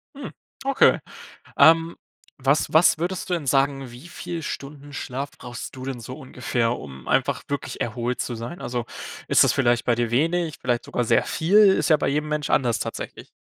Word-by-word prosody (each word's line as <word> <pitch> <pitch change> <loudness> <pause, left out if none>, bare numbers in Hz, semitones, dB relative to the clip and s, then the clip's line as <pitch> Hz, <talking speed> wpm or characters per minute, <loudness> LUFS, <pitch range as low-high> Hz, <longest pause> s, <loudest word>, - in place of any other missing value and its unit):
Mhm. 275 -1 -7 0.3
Okay. 275 -1 +4 0.6
Ähm, 165 +1 +5 0.4
was 135 +2 +1
was 160 +1 +5
würdest 180 +3 -3
du - - 0
denn 165 -4 -2
sagen, 135 -1 +1
wie 125 +8 -12
viel 175 -1 -6
Stunden 145 +1 -7
Schlaf 135 +2 -4
brauchst 125 +1 -8
du 130 - -8
denn 130 -2 -4
so 125 +3 -8
ungefähr, 125 -4 -2
um 65 -1 -10
einfach - - +1
wirklich 140 -1 -4
erholt 120 +2 -2
zu 120 - -4
sein? 120 +9 -7
Also, 120 -1 -3 0.4
ist - - +6
das - - +4
vielleicht 120 -3 +2
bei 120 - +3
dir 120 0 0
wenig, 165 +5 +1
vielleicht 120 -1 -1
sogar 125 - -1
sehr 115 - +3
viel? 175 +6 +1
Ist 200 -4 +5
ja 155 - +6
bei - - -1
jedem 150 +2 -1
Mensch 150 -1 -2
anders 120 -5 +2
tatsächlich. - - -6
135 Hz, 190 wpm, -24 LUFS, 120-160 Hz, 0.6 s, ist